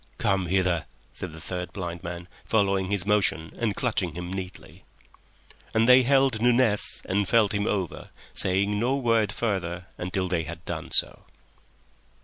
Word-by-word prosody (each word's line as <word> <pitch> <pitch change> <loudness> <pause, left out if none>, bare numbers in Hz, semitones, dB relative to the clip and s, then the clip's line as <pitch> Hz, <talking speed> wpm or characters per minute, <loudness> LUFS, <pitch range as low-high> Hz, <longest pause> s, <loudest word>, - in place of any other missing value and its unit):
"Come 95 -2 +1
hither," 90 -2 +1 0.3
said 90 - -5
the 80 - -11
third 90 +1 -5
blind 85 -3 -5
man, 85 0 -6 0.2
following 100 -3 +1
his 100 -3 0
motion 100 -6 +1
and 110 -4 0
clutching 100 -9 -1
him 90 +1 -5
neatly. 95 -1 -8 0.9
And 110 +1 +4
they 125 +1 +8
held 135 -3 +3
Nunez 120 -3 +3
and 100 +1 0
felt 110 -2 +3
him 100 0 0
over, 95 -5 -3 0.2
saying 100 +3 0
no 125 +4 +1
word 115 -6 +2
further 90 -6 -2
until 95 +1 -2
they 90 -2 0
had 85 +1 -9
done - - -5
so. - - +2
95 Hz, 150 wpm, -26 LUFS, 90-110 Hz, 0.9 s, they